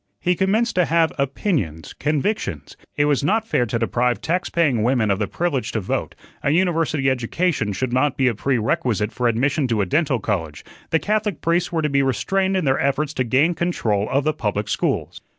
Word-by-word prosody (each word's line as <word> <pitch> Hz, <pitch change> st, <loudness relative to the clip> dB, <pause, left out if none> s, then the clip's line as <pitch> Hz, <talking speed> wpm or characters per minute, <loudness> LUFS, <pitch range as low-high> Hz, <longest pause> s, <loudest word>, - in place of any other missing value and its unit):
He 180 Hz, -, +1 dB
commenced 210 Hz, +6 st, +1 dB
to 180 Hz, -, +4 dB
have 165 Hz, 0 st, +2 dB
opinions, 135 Hz, -, -2 dB
convictions 150 Hz, -, -2 dB, 0.2 s
it 145 Hz, -, +3 dB
was 145 Hz, -2 st, +1 dB
not 220 Hz, +8 st, +1 dB
fair 125 Hz, -, +1 dB
to 115 Hz, -, -1 dB
deprive 120 Hz, 0 st, 0 dB
tax 175 Hz, +8 st, -1 dB
paying 145 Hz, -10 st, +1 dB
women 115 Hz, -2 st, +2 dB
of 100 Hz, -, 0 dB
the 105 Hz, -, 0 dB
privilege 165 Hz, -7 st, -2 dB
to 110 Hz, -, 0 dB
vote; 95 Hz, -, -3 dB, 0.3 s
a -, -, 0 dB
university 160 Hz, -4 st, +1 dB
education 130 Hz, -, 0 dB
should 120 Hz, +5 st, -2 dB
not 130 Hz, +2 st, +1 dB
be 130 Hz, -, +3 dB
a 120 Hz, -, +2 dB
prerequisite 110 Hz, -2 st, 0 dB
for 125 Hz, -1 st, 0 dB
admission 130 Hz, +4 st, +1 dB
to 115 Hz, -3 st, 0 dB
a 100 Hz, -, +2 dB
dental 140 Hz, -, +1 dB
college; 80 Hz, -10 st, -3 dB, 0.2 s
the 160 Hz, -, +3 dB
Catholic 210 Hz, -1 st, -1 dB
priests 170 Hz, +2 st, 0 dB
were 165 Hz, -2 st, -1 dB
to -, -, +2 dB
be 140 Hz, 0 st, +2 dB
restrained 190 Hz, +8 st, 0 dB
in 185 Hz, -, -1 dB
their 135 Hz, -1 st, +2 dB
efforts 140 Hz, +2 st, 0 dB
to 130 Hz, -, 0 dB
gain 135 Hz, +8 st, +2 dB
control 115 Hz, -, -1 dB
of 140 Hz, +2 st, +1 dB
the 155 Hz, -, +1 dB
public 105 Hz, -3 st, -2 dB
schools. -, -, -2 dB
140 Hz, 200 wpm, -21 LUFS, 115-170 Hz, 0.3 s, to